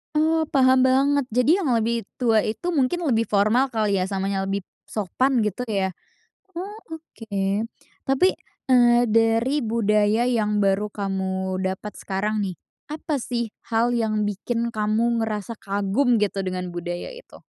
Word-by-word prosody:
Oh 315 +1 +2
paham 260 -1 +5
banget 275 +2 +3
jadi 250 +5 +3
yang 270 - +1
lebih 230 -1 0 0.2
tua 225 -3 +3
itu 285 +11 -3
mungkin 320 +2 +1
lebih 230 -1 +2
formal 215 +6 +3
kali 210 -3 +1
ya, 185 - 0
samanya 195 0 -2
lebih 195 +1 -2 0.2
sopan 240 +5 0
gitu 210 +4 -2
ya, 195 -4 0 0.7
oh 405 +5 -6
oke. 310 -10 -9 0.7
Tapi, 270 +7 +4 0.4
eee, 240 -1 +5
dari 230 +5 +3
budaya 215 -1 +2
yang 210 -4 +1
baru 195 +2 +1
kamu 190 -2 -3
dapat 190 +2 -3
sekarang 210 +2 -2
nih, 190 -3 -2 0.3
apa 300 -1 -3
sih 235 -2 -3 0.2
hal 230 +1 +1
yang 220 -3 0
bikin 230 +3 -2
kamu 220 +2 +1
ngerasa 220 0 -3
kagum 205 +6 +1
gitu 205 -2 0
dengan 180 -1 -3
budaya 175 - -5
itu? - - -14
225 Hz, 145 wpm, -23 LUFS, 200-250 Hz, 0.7 s, paham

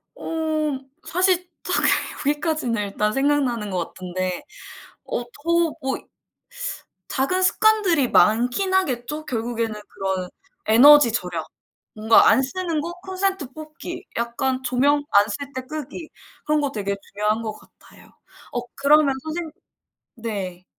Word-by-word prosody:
어. 310 -3 -2 0.3
사실 365 0 +2
딱히 - - +2 0.4
여기까지는 295 -6 0
일단 210 +1 -1
생각나는 270 -6 +1
것 175 -2 -1
같은데 185 0 -4 0.6
어 240 - -2
더 330 +6 0
뭐 265 -1 -1 1.1
작은 285 +8 0
습관들이 375 - +3
많긴 245 - +3
하겠죠. 300 -4 -1
결국에는 230 -3 -3
그런 190 -1 -3 0.4
에너지 260 +4 +8
절약 180 -7 -2 0.5
뭔가 220 +1 +5
안 265 - +5
쓰는 330 +3 -2
거 340 +2 -4
콘센트 380 -6 -2
뽑기 315 +5 -8
약간 255 +3 -1
조명 275 +4 +2
안 200 0 +7
쓸 280 +5 -4
때 260 - -3
끄기 305 +3 -7 0.4
그런 300 0 +2
거 285 -1 0
되게 200 -5 -2
중요한 210 +2 0
것 220 -1 -3
같아요. - - -19 0.4
어 245 - -1
그러면 285 0 +4
선생 320 +1 -4 0.6
네. 195 -6 -5
270 Hz, 240 characters per minute, -23 LUFS, 220-315 Hz, 1.1 s, 에너지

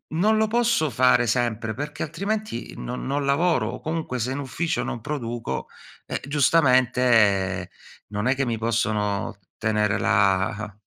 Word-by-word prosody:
non 215 +5 +3
lo 220 - +2
posso 230 -7 +2
fare 125 0 +4
sempre, 115 -2 0
perché 145 +4 -5
altrimenti 200 - -4
non 125 - -5
non 140 +1 -1
lavoro 140 -4 +2
o 125 - -7
comunque 155 -5 -3
se 125 +3 -1
in 140 - -4
ufficio 145 +4 -2
non 120 - -4
produco, 120 - -4 0.4
eh, - - -3
giustamente 125 - +3 0.4
non 105 +3 -1
è 130 - +3
che 135 0 0
mi 115 -2 -1
possono 105 -3 -1 0.2
tenere 105 -1 +1
la 100 +2 +1
125 Hz, 145 wpm, -24 LUFS, 110-145 Hz, 0.4 s, fare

